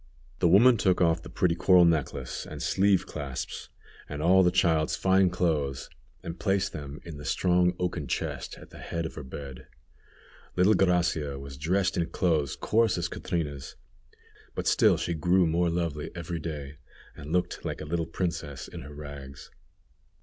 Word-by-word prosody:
The - - +4
woman 115 +8 +6
took 95 -3 +2
off 85 -1 +3
the - - -10
pretty 90 -2 +1
coral 90 0 +5
necklace 80 -5 -1
and - - -8
sleeve 95 -1 +2
clasps, 70 -4 -6 0.4
and 75 - -5
all 90 +4 +5
the 90 - +5
child's 80 -4 +2
fine 95 +3 +3
clothes, 75 -7 -1 0.3
and 85 +1 -6
placed 100 -1 0
them 75 -1 -7
in 80 -4 -8
the 75 - -9
strong 90 +2 +2
oaken 85 -5 -2
chest - - -3
at - - -14
the - - -12
head 85 -1 -4
of 80 - -5
her - - -7
bed. 70 -1 -9 0.9
Little 90 +4 +5
Gracia 85 -7 +1
was 70 0 -8
dressed 90 +7 0
in 85 -1 +1
clothes 80 -7 0
coarse 115 -2 +2
as 85 -1 -2
Catrina's, 75 -8 -4 0.8
but - - -3
still - - +4
she 85 - -2
grew 90 +3 +3
more 85 +2 +1
lovely 85 -3 -2
every 85 0 -4
day, 75 -3 -6 0.4
and 75 +2 -9
looked 90 +1 -1
like - - -4
a - - -6
little 80 +1 -2
princess 80 -7 -4
in - - -9
her 70 +3 -10
rags. 70 -2 -9
85 Hz, 170 wpm, -28 LUFS, 75-90 Hz, 0.9 s, woman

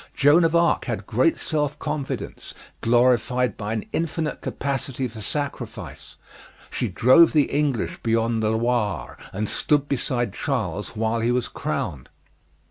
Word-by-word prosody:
Joan 150 +5 +5
of 165 +1 +1
Arc 170 0 +3
had - - -3
great 330 - +2
self 150 -2 -1
confidence, 135 -9 -4 0.3
glorified 125 +1 +3
by 105 +1 -4
an 110 - -3
infinite 160 -2 -2
capacity 135 -2 -2
for 110 -2 -9
sacrifice. 145 +7 -5 0.6
She - - -1
drove 130 +8 +6
the 150 -3 +3
English 140 -5 0
beyond 115 0 +1
the 110 - +1
Loire, 115 -1 0 0.2
and 105 +2 -2
stood 145 +4 +1
beside 125 -3 -1
Charles 105 - -2
while 110 +1 0
he 115 +2 +1
was 125 -1 0
crowned. 65 -4 -4
125 Hz, 135 wpm, -24 LUFS, 115-145 Hz, 0.6 s, drove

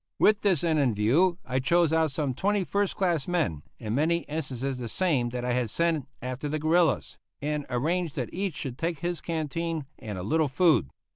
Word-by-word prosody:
With 210 -1 +4
this 185 -7 +2
end 160 -2 +2
in 125 -6 +2
view 155 - +3
I 130 +1 0
chose 165 +4 +3
out 160 -1 +3
some 140 -1 -1
twenty 200 +7 +1
first 200 +1 0
class 175 -7 0
men, 160 - 0 0.2
in 110 -2 -4
many 165 +6 +2
instances 135 -4 -3
the 120 - -4
same 135 - +1
that 125 0 -4
I 125 - 0
had 120 -2 0
sent 160 -1 +1 0.2
after 130 +3 -3
the 155 - -1
guerillas, 160 +1 +2 0.2
and 150 0 -2
arranged 160 +6 0
that 125 -6 -3
each 190 -2 -2
should 130 -4 -5
take 165 -2 -2
his 175 -2 -2
canteen 165 -1 -2
and 105 -4 -6
a 90 - -4
little 155 - +2
food. 145 - +3
155 Hz, 200 wpm, -27 LUFS, 130-170 Hz, 0.2 s, With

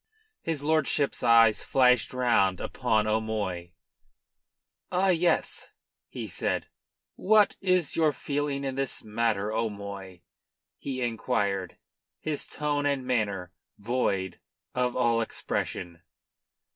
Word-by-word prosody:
His 160 -4 -2
lordship's 150 -2 +1
eyes 115 -2 +5
flashed 125 -3 +3
round 115 -7 +2
upon 110 -1 0
O'Moy. 105 -5 -2 1.2
"Ah 190 +2 +2
yes!" 175 -1 +1 0.4
he - - -6
said. - - -1 0.5
"What 210 +1 +4
is 185 -5 +1
your 160 -2 +3
feeling 145 0 -2
in 135 -1 -2
this 135 0 -2
matter, 110 -1 0
'O'Moy?" 100 -4 -4 0.6
he 130 -2 -3
inquired, 100 -5 -1 0.4
his 155 -2 -3
tone 145 -1 -1
and 140 -2 -1
manner 100 -8 -1 0.3
void 100 -5 -1 0.3
of 125 -1 0
all 115 -2 +2
expression. 85 -5 -3
120 Hz, 105 wpm, -28 LUFS, 100-145 Hz, 1.2 s, eyes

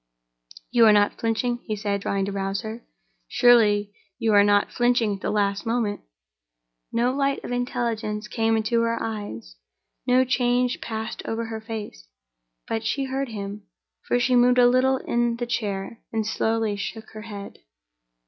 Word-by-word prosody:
"You 235 -2 +6
are 215 - +7
not 205 0 +2
flinching," 235 +2 0
he 215 - -2
said, 200 -1 -2
trying 195 -1 -1
to 200 - -4
rouse 195 0 -2
her. 225 +1 -7 0.4
"Surely 210 -4 +4 0.2
you 225 -3 +1
are 205 0 +7
not 205 0 +3
flinching 240 -3 +2
at 195 - -7
the - - -2
last 200 -1 0
moment?" 225 -3 -1 0.9
No 240 +2 +1
light 275 0 0
of - - -6
intelligence 230 -4 -2
came 225 0 +1
into 220 +2 +1
her 230 0 0
eyes, 205 - -6 0.5
no 255 +1 +4
change 250 -1 +1
passed 220 0 -5
over 230 +1 -2
her 225 -1 -6
face. 215 - -7 0.6
But 225 0 -2
she 275 +5 -1
heard 270 0 -2
him—for 205 +3 -5
she 250 +1 +2
moved 245 +1 +5
a 245 - +7
little 255 +2 +3
in 240 -2 0
the 240 +1 -3
chair, 210 -2 -3
and 220 -1 -1
slowly 225 -1 0
shook 220 +2 -6
her 215 - -9
head. 205 -2 -9
225 Hz, 160 wpm, -24 LUFS, 205-245 Hz, 0.9 s, are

